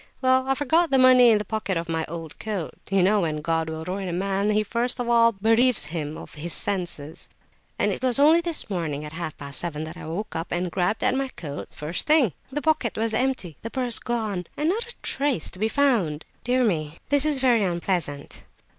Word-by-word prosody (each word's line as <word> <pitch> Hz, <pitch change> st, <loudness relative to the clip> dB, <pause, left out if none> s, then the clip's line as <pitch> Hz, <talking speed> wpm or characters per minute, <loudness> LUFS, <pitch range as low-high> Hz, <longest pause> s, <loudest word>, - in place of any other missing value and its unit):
Well, 260 Hz, 0 st, +3 dB
I 270 Hz, -, +2 dB
forgot 315 Hz, +5 st, +2 dB
the 270 Hz, -, +3 dB
money 255 Hz, -1 st, +7 dB
in 220 Hz, -, +5 dB
the 210 Hz, -, -3 dB
pocket 205 Hz, -3 st, -2 dB
of 165 Hz, 0 st, -3 dB
my 160 Hz, -1 st, -1 dB
old 165 Hz, -1 st, -8 dB
coat—you 195 Hz, -1 st, -2 dB
know 205 Hz, +2 st, +3 dB
when 155 Hz, -3 st, -1 dB
God 165 Hz, 0 st, 0 dB
will 160 Hz, 0 st, -5 dB
ruin 190 Hz, +2 st, -3 dB
a 175 Hz, -, -3 dB
man 195 Hz, +3 st, 0 dB
he 215 Hz, 0 st, +2 dB
first 235 Hz, +4 st, -1 dB
of 245 Hz, -, -2 dB
all 230 Hz, -1 st, +5 dB
bereaves 225 Hz, -, +3 dB
him 155 Hz, -2 st, -3 dB
of -, -, -11 dB
his 155 Hz, +2 st, -5 dB
senses—and 175 Hz, -6 st, -4 dB
it -, -, -4 dB
was 255 Hz, -1 st, +3 dB
only 310 Hz, +4 st, +6 dB
this 340 Hz, -2 st, 0 dB
morning 160 Hz, -7 st, -3 dB
at 150 Hz, -, -8 dB
half 160 Hz, -2 st, -5 dB
past 140 Hz, -1 st, -5 dB
seven 155 Hz, -3 st, -4 dB
that 160 Hz, +2 st, -8 dB
I -, -, -8 dB
woke 190 Hz, +7 st, -5 dB
up 165 Hz, +1 st, -4 dB
and 175 Hz, 0 st, -1 dB
grabbed 190 Hz, +5 st, 0 dB
at -, -, +3 dB
my 270 Hz, +1 st, 0 dB
coat 150 Hz, -, -7 dB
pocket, -, -, -26 dB
first 155 Hz, +4 st, -2 dB
thing. 295 Hz, -, +4 dB, 0.2 s
The 295 Hz, +2 st, -3 dB
pocket 310 Hz, -8 st, +1 dB
was 225 Hz, 0 st, 0 dB
empty—the 230 Hz, -, -2 dB
purse 250 Hz, -1 st, -1 dB
gone, 215 Hz, -7 st, -3 dB
and 305 Hz, +2 st, +1 dB
not 465 Hz, +5 st, -1 dB
a -, -, -14 dB
trace 275 Hz, -, -1 dB
to 185 Hz, -, -12 dB
be 220 Hz, +2 st, +1 dB
found!" 220 Hz, -, +1 dB, 0.2 s
"Dear 250 Hz, +1 st, +2 dB
me! 160 Hz, -7 st, -1 dB
This 285 Hz, 0 st, +4 dB
is 305 Hz, -2 st, +2 dB
very 245 Hz, -5 st, +3 dB
unpleasant!" 170 Hz, -5 st, -2 dB
205 Hz, 215 wpm, -24 LUFS, 165-255 Hz, 0.2 s, money